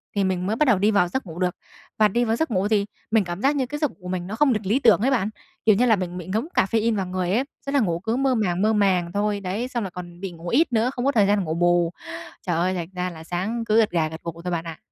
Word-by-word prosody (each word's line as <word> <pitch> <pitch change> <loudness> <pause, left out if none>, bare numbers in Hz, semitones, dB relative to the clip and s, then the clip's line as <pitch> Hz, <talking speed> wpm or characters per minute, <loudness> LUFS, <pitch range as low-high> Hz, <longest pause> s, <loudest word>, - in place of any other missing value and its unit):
thì 200 - +2
mình 185 -1 0
mới 215 - 0
bắt 300 +6 +2
đầu 245 -6 +4
đi 210 +3 +3
vào 200 -4 +3
giấc 265 +9 -3
ngủ 170 -1 -8
được. 180 -1 0 0.4
Và 215 - +5
đi 240 +4 +1
vào 225 0 +1
giấc 320 +2 -1
ngủ 195 -1 +1
thì 210 -2 +2 0.3
mình 220 -2 +4
cảm 175 +1 -5
giác 275 +4 +3
như 265 -3 +1
cái 295 +4 -5
giấc 300 -2 0
ngủ - - -23
của 180 - -9
mình 180 -1 -3
nó 210 - -4
không 270 +1 +3
được 210 -2 -3
lý 220 +8 +2
tưởng 225 -6 +5
ấy 265 +4 +2
bạn, 215 -6 +1 0.4
kiểu 215 - +6
như 240 +5 +3
là, 225 -3 +5
mình 180 -2 -4
bị 180 - -7
ngấm 220 +9 -1
caffeine 225 +3 +2
vào 195 -2 -1
người 180 0 -2
ấy, 240 +6 +2 0.2
tức 275 - -3
là 285 - +3
ngủ 170 -8 0
cứ 220 +6 -1
mơ 265 -1 +2
màng 185 -5 0
mơ 215 +2 +3
màng 185 -5 +2
thôi. 205 +1 0
Đấy, 200 +5 -3
xong 245 -3 -3
là 195 - -4
còn 175 -1 -9
bị 190 -1 -5
ngủ 170 +1 -8
ít 265 - +2
nữa, 230 +2 +2
không 245 -1 -3
có 280 - +4
thời 210 -6 +3
gian 205 +1 +3
để 195 - -1
ngủ 160 - -2
bù. 175 0 +2 0.6
Trời 175 - +1
ơi, 180 +3 +1
thành 175 -2 -4
ra 180 0 -1
là 160 -2 -10
sáng 190 +8 -2
cứ 215 0 +2
gật 225 -2 +4
gà 160 -3 +1
gật 160 +1 -9
gù 170 0 -6
thôi 180 - -3
bạn 170 -1 -1
ạ. 165 -1 -6
200 Hz, 320 wpm, -24 LUFS, 180-230 Hz, 0.6 s, kiểu